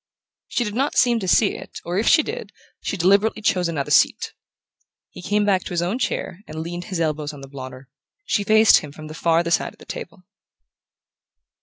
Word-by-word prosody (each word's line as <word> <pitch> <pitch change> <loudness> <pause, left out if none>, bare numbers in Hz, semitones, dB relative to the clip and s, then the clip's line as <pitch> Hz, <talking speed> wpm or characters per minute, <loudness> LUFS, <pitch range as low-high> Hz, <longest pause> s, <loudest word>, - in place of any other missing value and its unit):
She 245 - -1
did 210 -3 -4
not 270 +6 -1
seem 240 -2 +4
to 190 - -4
see 200 +3 +3
it, - - -9
or, 175 +3 -1
if 220 - -1
she 315 - +6
did, 470 +2 -6 0.3
she 200 - -3
deliberately 200 +5 +2
chose 180 -4 +2
another 155 -5 -3
seat. - - +3 0.8
He - - -10
came 205 +3 +1
back 190 -3 +2
to - - -5
his 175 0 0
own 195 +8 -2
chair 185 -7 -2
and 155 - -7
leaned 175 +1 -6
his 185 -3 -4
elbows 155 -2 -1
on 145 - -11
the 135 - -9
blotter. 130 -1 -9 0.4
She 205 - 0
faced 220 +2 +6
him 150 - -9
from 155 +1 -10
the - - -7
farther 165 +1 +1
side - - +1
of - - -23
the - - -15
table. 340 - -8
180 Hz, 205 wpm, -22 LUFS, 160-215 Hz, 0.8 s, she